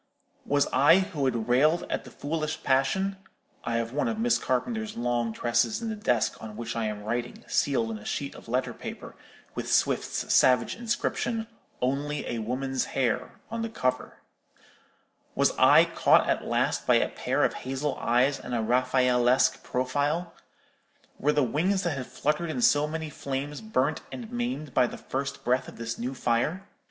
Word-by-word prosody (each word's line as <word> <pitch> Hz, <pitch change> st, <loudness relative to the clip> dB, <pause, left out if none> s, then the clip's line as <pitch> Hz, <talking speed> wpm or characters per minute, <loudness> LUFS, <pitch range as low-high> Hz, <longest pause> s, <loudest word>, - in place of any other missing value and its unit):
—was 145 Hz, 0 st, +3 dB
I, 155 Hz, +5 st, +6 dB
who 185 Hz, -8 st, -1 dB
had 120 Hz, -4 st, -1 dB
railed 150 Hz, +7 st, +3 dB
at -, -, -3 dB
the -, -, -10 dB
foolish 155 Hz, +1 st, -3 dB
passion—(I 190 Hz, 0 st, -1 dB
have 115 Hz, +1 st, -2 dB
one 150 Hz, -, 0 dB
of 225 Hz, -2 st, -2 dB
Miss 235 Hz, +1 st, +2 dB
Carpenter's 220 Hz, -, -2 dB
long 120 Hz, -1 st, 0 dB
tresses 120 Hz, -, +1 dB
in 230 Hz, -1 st, -4 dB
the 220 Hz, -, -3 dB
desk 125 Hz, -, 0 dB
on 110 Hz, -1 st, -8 dB
which 115 Hz, 0 st, -4 dB
I 115 Hz, -1 st, -1 dB
am 105 Hz, -1 st, -4 dB
writing, 120 Hz, +3 st, -3 dB
sealed 115 Hz, -5 st, +1 dB
in 110 Hz, -, -5 dB
a -, -, -13 dB
sheet 140 Hz, -, -3 dB
of -, -, -13 dB
letter 125 Hz, +3 st, -1 dB
paper, -, -, -8 dB, 0.4 s
with -, -, -4 dB
Swift's -, -, +1 dB
savage 125 Hz, -1 st, +4 dB
inscription, 230 Hz, 0 st, -1 dB, 0.4 s
'Only 145 Hz, +3 st, -1 dB
a 120 Hz, -, -2 dB
woman's 130 Hz, +3 st, -2 dB
hair,' 125 Hz, -5 st, 0 dB, 0.2 s
on 230 Hz, 0 st, -3 dB
the 230 Hz, -, -2 dB
cover)—was 130 Hz, -, -4 dB
I -, -, +7 dB
caught -, -, +4 dB
at -, -, 0 dB
last -, -, 0 dB
by -, -, +5 dB
a -, -, +3 dB
pair -, -, -1 dB
of -, -, +2 dB
hazel 135 Hz, +3 st, -3 dB
eyes 125 Hz, +4 st, +2 dB
and 125 Hz, -, -5 dB
a 115 Hz, -, +1 dB
Raffaellesque 125 Hz, +1 st, +3 dB
profile? 145 Hz, +7 st, -1 dB, 0.9 s
Were 150 Hz, -, +3 dB
the 150 Hz, -1 st, +2 dB
wings 180 Hz, -, +1 dB
that 170 Hz, -4 st, -1 dB
had 130 Hz, -2 st, -5 dB
fluttered 150 Hz, +3 st, -1 dB
in 245 Hz, +9 st, -2 dB
so 150 Hz, -9 st, +4 dB
many 160 Hz, 0 st, -4 dB
flames 140 Hz, +1 st, -4 dB
burnt 155 Hz, -9 st, 0 dB
and 235 Hz, -2 st, -7 dB
maimed 240 Hz, -, -3 dB
by 125 Hz, -, +4 dB
the -, -, -8 dB
first 140 Hz, +1 st, -4 dB
breath 125 Hz, +1 st, +1 dB
of -, -, -11 dB
this 115 Hz, 0 st, -5 dB
new 125 Hz, +3 st, -3 dB
fire? 130 Hz, +11 st, 0 dB
135 Hz, 170 wpm, -27 LUFS, 120-170 Hz, 0.9 s, I